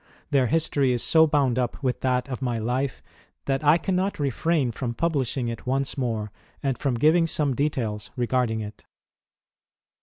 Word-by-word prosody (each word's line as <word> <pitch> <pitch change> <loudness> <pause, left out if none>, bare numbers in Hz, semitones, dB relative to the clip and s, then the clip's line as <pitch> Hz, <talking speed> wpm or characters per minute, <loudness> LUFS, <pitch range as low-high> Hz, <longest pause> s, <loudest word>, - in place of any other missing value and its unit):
Their 135 -3 +3
history 145 -3 +2
is 120 - -1
so 160 -1 +5
bound 140 -5 +2
up 125 +3 -2
with 125 -2 0
that 125 -1 0
of 130 -1 -5
my 120 -3 -1
life 125 +4 -2 0.4
that 135 +1 -1
I 150 +3 +6
cannot 190 +3 -1
refrain 145 -1 0
from 120 0 -4
publishing 135 -6 -1
it 115 +1 -6
once 135 +1 0
more 115 -6 -2 0.3
and 135 -2 +1
from 135 -3 -1
giraig 165 +5 +4
some 145 -3 +1
details 115 -8 -2
regarding 120 -2 0
it. 105 -1 -9
130 Hz, 160 wpm, -25 LUFS, 120-150 Hz, 0.4 s, I